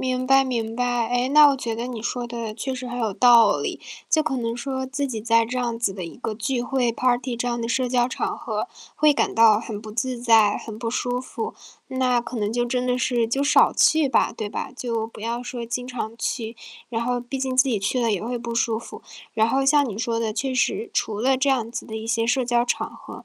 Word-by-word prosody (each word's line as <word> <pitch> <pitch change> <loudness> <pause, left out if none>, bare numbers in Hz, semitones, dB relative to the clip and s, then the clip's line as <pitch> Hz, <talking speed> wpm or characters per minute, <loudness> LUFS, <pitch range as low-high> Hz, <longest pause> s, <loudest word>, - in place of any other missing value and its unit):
明 255 0 -1
白 270 0 +6
明 230 -3 -3
白。 245 -2 0
诶， 245 +1 +1
那 300 +1 +8
我 275 - +2
觉 230 -3 -3
得 235 +2 -4
你 240 -3 -5
说 240 +2 -3
的 235 -2 -5
确 265 +4 -4
实 255 0 -5
很 245 0 -4
有 220 -3 0
道 230 -1 +6
理， - - -4 0.3
就 310 - +3
可 305 -3 -1
能 230 -1 -2
说 260 +1 -3
自 280 +1 -2
己 225 -4 -4
在 230 +1 +3
这 250 +3 -3
样 240 -2 -1
子 230 -4 0
的 185 -2 -6
一 165 - -9
个 230 -3 -4
聚 240 +3 -1
会 245 -2 0
party 245 0 0
这 245 +1 -2
样 240 -1 -2
的 230 - -3
社 250 +2 0
交 245 -1 +2
场 255 - -3
合 - - -3 0.3
会 300 0 +4
感 290 - 0
到 225 -2 +6
很 215 -2 -6
不 215 0 -9
自 240 +2 -3
在， 225 -4 +5
很 220 -1 -8
不 230 - -3
舒 245 +1 -1
服， 440 - -5 0.4
那 255 -2 +1
可 240 - -7
能 210 -1 -1
就 240 0 +1
真 250 +1 -1
的 250 0 +1
是， 240 -2 +1
就 270 +5 0
少 285 - +5
去 315 -3 +4
吧， - - +2
对 215 - -5
吧？ - - -5
就 235 -3 -3
不 225 - -10
要 235 +3 -3
说 240 -1 -6
经 245 +1 -3
常 230 -3 -5
去， 230 -1 -3 0.3
然 230 -1 -2
后 245 +1 0
毕 245 +3 -6
竟 260 -1 -2
自 260 - +6
己 220 -6 0
去 205 +6 0
了 230 -2 +1
也 195 - -2
会 240 +2 -3
不 235 0 -5
舒 230 -1 +1
服。 230 - -11 0.3
然 220 0 +3
后 270 +3 +1
像 285 -2 +4
你 210 - -6
说 230 0 -1
的， 220 -1 -1
确 260 +4 -2
实， 235 -2 0
除 210 -2 -1
了 265 +2 +3
这 270 +2 +2
样 235 -4 0
子 - - -5
的 220 - -7
一 220 0 -6
些 230 0 +1
社 250 +2 +1
交 240 0 +2
场 245 - -1
合， - - -12
240 Hz, 280 characters per minute, -23 LUFS, 230-255 Hz, 0.4 s, 那